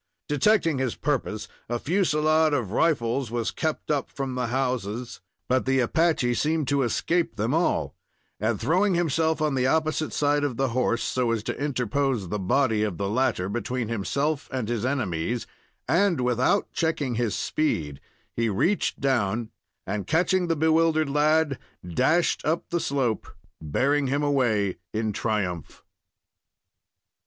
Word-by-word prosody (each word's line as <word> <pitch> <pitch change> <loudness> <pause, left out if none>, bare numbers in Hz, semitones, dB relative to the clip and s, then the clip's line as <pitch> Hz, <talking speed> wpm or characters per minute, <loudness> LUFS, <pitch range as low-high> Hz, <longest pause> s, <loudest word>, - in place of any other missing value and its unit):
Detecting 160 0 +2
his 130 -3 -1
purpose, 135 -7 -2 0.2
a 120 - 0
fusilade 155 -1 +2
of 115 -9 -2
rifles 125 -3 +1
was 115 -1 -2
kept 160 -2 -2
up 145 -2 0
from 135 -2 -4
the 125 -1 -1
houses, 125 -2 -2 0.3
but 130 +1 +1
the 135 0 +3
Apache 135 -1 +2
seemed 155 +2 0
to 140 -1 +2
escape 160 +4 0
them 110 +4 -1
all; 165 +2 0 0.4
and, 110 +1 0
throwing 185 +4 +2
himself 160 -1 +1
on 150 -2 +1
the 130 -1 +1
opposite 155 +1 0
side 145 0 +1
of 135 -5 -1
the 135 -1 +1
horse, 120 -1 0
so 125 -2 0
as 115 -2 0
to 135 - -4
interpose 130 -5 -1
the 105 - -2
body 110 +2 +2
of 105 -5 -1
the 100 - -2
latter 115 -4 0
between 120 +2 -3
himself 140 +7 -1
and 130 -5 -3
his 115 -2 -1
enemies, 120 -5 -1 0.4
and, 170 +2 +2
without 125 - +1
checking 155 -6 -1
his 115 -2 -1
speed, 75 - -1 0.3
he 115 -1 +1
reached 170 - 0
down, 120 -4 0 0.3
and 100 +1 -3
catching 180 +3 +2
the 165 - +1
bewildered 160 -1 +2
lad, 150 -1 +2 0.3
dashed 130 - +2
up 160 +2 -1
the 175 - +1
slope, 135 -8 -1 0.3
bearing 135 - +1
him 140 +3 0
away 120 - +1 0.2
in 110 -1 -1
triumph. 95 -8 -3
130 Hz, 145 wpm, -25 LUFS, 115-155 Hz, 0.4 s, the